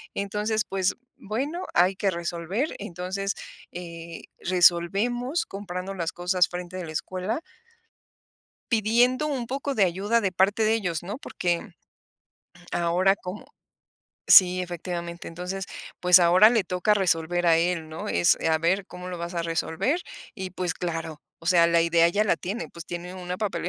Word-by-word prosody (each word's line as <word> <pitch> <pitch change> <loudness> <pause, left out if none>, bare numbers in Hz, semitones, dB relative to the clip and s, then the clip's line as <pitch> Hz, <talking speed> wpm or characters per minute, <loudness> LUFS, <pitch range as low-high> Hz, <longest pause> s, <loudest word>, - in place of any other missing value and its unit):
Entonces, 210 +2 -1
pues, 190 -1 +1 0.3
bueno 280 - -3
hay 180 +2 +4
que 195 0 0
resolver. 170 - -3
Entonces, 190 +3 -3 0.4
eh, 170 -1 -8 0.2
resolvemos 195 - +2
comprando 195 -1 -6
las 170 -3 -2
cosas 180 +1 +2
frente 180 +1 -6
de 180 - -5
la 160 - -7
escuela 185 - -3 1.3
pidiendo 240 +6 +3
un 270 -5 -2
poco 275 +2 -3
de 210 - +4
ayuda 200 +6 +1
de 195 -3 0
parte 195 +4 +2
de 215 +1 +3
ellos 180 -7 -2
¿no? 205 +6 -5
Porque 175 - -3 1.0
ahora 175 +3 +2
como 185 +2 -8 0.8
sí 185 -1 +8
efectivamente. 175 -1 -5
Entonces, 180 +3 -5 0.3
pues, 180 0 +7
ahora 180 +5 +6
le 225 -5 +2
toca 180 +4 +1
resolver 175 -2 +1
a 165 -1 +6
él, 165 -2 0
¿no? 165 +7 -6
Es, 170 - +3
a 160 0 +3
ver, 185 +4 +1
cómo 180 0 -9
lo 180 -1 -5
vas 170 +1 -5
a 170 - -1
resolver 165 - -1 0.3
y, 190 -3 -5
pues, 180 -1 -3
claro, 165 -3 -5 0.2
o 165 - -13
sea, 170 -1 +5
la 170 0 +4
idea 170 0 +4
ya 205 +5 +1
la 210 - +3
tiene, 200 +6 -5
pues, 170 0 -11
tiene 175 +1 -6
una 180 -1 -5
papelería 205 -5 -2
180 Hz, 155 wpm, -26 LUFS, 170-205 Hz, 1.3 s, sí